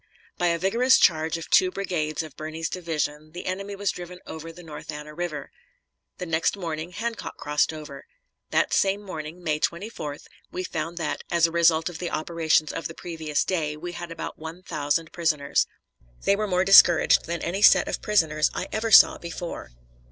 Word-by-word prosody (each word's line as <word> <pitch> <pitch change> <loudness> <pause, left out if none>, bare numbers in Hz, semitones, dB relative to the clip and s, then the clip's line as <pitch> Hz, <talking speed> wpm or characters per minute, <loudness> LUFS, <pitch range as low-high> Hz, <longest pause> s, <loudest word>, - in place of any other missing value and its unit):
By 175 - +2
a 170 0 +2
vigorous 230 +9 +4
charge 160 0 +3
of 165 - -8
two 185 - +5
brigades 170 -5 -2
of 155 -3 -11
Birney's 155 +1 -4
division, 155 -3 -3
the 175 - -7
enemy 195 +2 -4
was 200 -1 -1
driven 180 0 -9
over 160 +1 -8
the 175 +2 -13
North 155 -1 -8
Anna 150 0 -8
River. 155 -4 -5 0.7
The 180 - -5
next 165 +3 0
morning 165 -2 -4
Hancock 230 +5 -5
crossed 150 +1 +1
over. 155 - -9 0.4
That - - +1
same 200 +1 +2
morning, 165 -2 -7
May 155 -2 0
24th, 170 -5 -4 0.3
we 185 - -4
found 165 0 -4
that, 170 - -3
as 170 -1 +4
a 165 - 0
result 165 -1 +3
of 175 -3 -6
the 175 - -3
operations 160 -1 +1
of 165 - -4
the - - -10
previous 160 -4 -2
day, 155 -5 -1
we 175 +3 -6
had 175 0 -7
about 165 - -6
one 160 +3 -8
thousand 155 0 -1
prisoners. 155 -5 +1 0.6
They 200 - +3
were 215 +1 -2
more 185 -1 +1
discouraged 175 -4 +7
than 170 0 -4
any 185 +4 -2
set - - +7
of - - -3
prisoners 160 -7 +2
I - - -4
ever 220 +1 -1
saw 215 - +8
before. 170 - -6
165 Hz, 185 wpm, -25 LUFS, 155-180 Hz, 0.7 s, saw